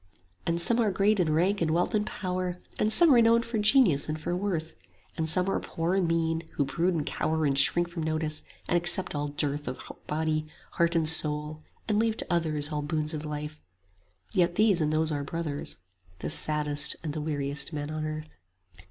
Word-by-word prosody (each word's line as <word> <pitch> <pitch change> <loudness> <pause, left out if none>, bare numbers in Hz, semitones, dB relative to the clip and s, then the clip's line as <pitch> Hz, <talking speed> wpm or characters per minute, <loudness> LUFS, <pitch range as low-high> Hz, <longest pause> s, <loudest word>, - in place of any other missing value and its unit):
And 170 0 0
some 235 +7 +5
are 225 -3 +2
great 200 +2 +1
in 165 -4 +1
rank 180 +6 +1
and 165 - +1
wealth 175 +7 0
and 210 0 0
power, 180 -1 -3 0.2
And 215 - +2
some 315 +6 +8
renowned 230 -1 +4
for 230 -2 -3
genius 210 - +4
and 155 +1 -3
for 175 +3 -3
worth; 175 -4 -3 0.4
And 160 0 +1
some 180 +3 +4
are 195 - 0
poor 165 +2 -3
and 190 -3 +1
mean, 165 -1 0
who 145 - 0
brood 170 +5 -1
and 150 -3 -2
cower 160 0 -1
And 140 -1 +1
shrink 175 +5 +4
from 170 -1 -6
notice, 155 -1 -1 0.3
and - - 0
accept 175 +2 +1
all 145 0 -2
dearth 145 0 -3
25 125 - -7
Of - - -21
body, 155 0 -1 0.2
heart 170 0 0
and 160 -2 +2
soul, 150 -1 +2 0.3
and 210 -1 +1
leave 225 0 0
to - - -3
others 155 -3 0
All 150 -1 -2
boons 155 +1 -2
of 155 0 -5
life: 150 0 -6 0.7
yet 175 -4 +1
these 205 -4 +3
and 150 0 0
those 155 0 0
are 145 -1 -2
brothers, 150 -1 -5 0.4
The - - -2
saddest 150 -1 +2
and 155 -3 -4
the 155 - -4
weariest 145 -1 -2
men 150 -1 -5
on 155 0 -4
earth. 155 0 -5
160 Hz, 205 wpm, -27 LUFS, 150-180 Hz, 0.7 s, some